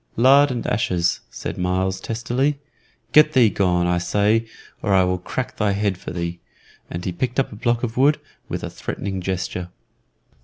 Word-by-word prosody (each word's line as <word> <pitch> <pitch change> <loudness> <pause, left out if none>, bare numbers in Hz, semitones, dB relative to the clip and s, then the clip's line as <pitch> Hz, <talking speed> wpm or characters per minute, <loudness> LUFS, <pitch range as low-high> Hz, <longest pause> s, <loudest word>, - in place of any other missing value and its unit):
"Lard 135 +4 +6
and 125 -3 -3
ashes," 90 -5 +1
said - - -6
Myles, 95 +1 0
testily. 125 +5 -1 0.5
"Get 150 0 +6
thee 120 -5 +5
gone, 90 -3 +2
I 90 0 +1
say, 105 +5 +1 0.3
or 100 -3 +2
I 95 - +5
will 90 0 0
crack 125 +8 -4
thy 105 -2 +1
head 100 -1 0
for 90 - -9
thee;" 85 0 -4 0.5
and 85 +1 -5
he 90 - -1
picked 125 +9 -2
up 135 - 0
a - - -8
block 120 +2 0
of 115 -1 -3
wood, 145 +4 +4 0.3
with - - -4
a - - -3
threatening 95 -1 -4
gesture. 90 -1 -3
100 Hz, 180 wpm, -22 LUFS, 90-120 Hz, 0.5 s, Lard